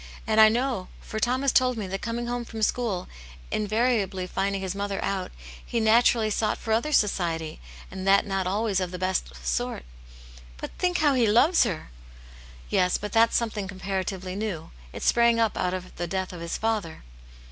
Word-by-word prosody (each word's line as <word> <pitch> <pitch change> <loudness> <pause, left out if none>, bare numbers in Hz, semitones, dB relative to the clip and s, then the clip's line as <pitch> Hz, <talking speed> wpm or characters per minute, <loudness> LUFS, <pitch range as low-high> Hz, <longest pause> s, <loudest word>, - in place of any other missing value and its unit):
And 220 0 +4
I 215 - +9
know, 240 -4 -1
for 220 - -6
Tom 250 +4 +1
has 275 - +3
told 255 -2 +3
me, 210 - -3
that 190 +1 -4
coming 235 +1 -3
home 240 0 -2
from 225 -1 -5
school, 210 -6 0 0.4
and - - 0
invariably 215 -4 +1
finding 195 +2 -1
his 190 -1 -3
mother 200 0 -3
out, 190 -2 -2 0.3
he 235 - -2
naturally 225 0 +4
sought 215 +1 0
for 220 - -2
other 235 +7 +1
society, 170 - 0 0.3
and 190 0 -5
that 195 0 +5
not 195 -2 -1
always 205 0 0
of 185 -1 -2
the 180 - -6
best 185 - -1
sort." 60 0 -2 0.4
" - - -18
But - - -6
think 360 -1 +1
how 295 -2 +3
he 245 -4 +3
loves 245 - +5
her 160 - -4 0.4
!" - - -19
"Yes; 180 0 +3
but 210 0 -6
that's 230 0 +4
something 215 -4 -2
comparatively 190 -1 -4
new. 200 -6 -4 0.2
It - - -7
sprang 235 -1 +4
up 225 -2 +2
out 180 0 0
of 185 0 -8
the 175 - -2
death 190 +1 -3
of 175 - -8
his 170 0 -3
father." 215 -7 -2
200 Hz, 195 wpm, -26 LUFS, 185-230 Hz, 0.4 s, I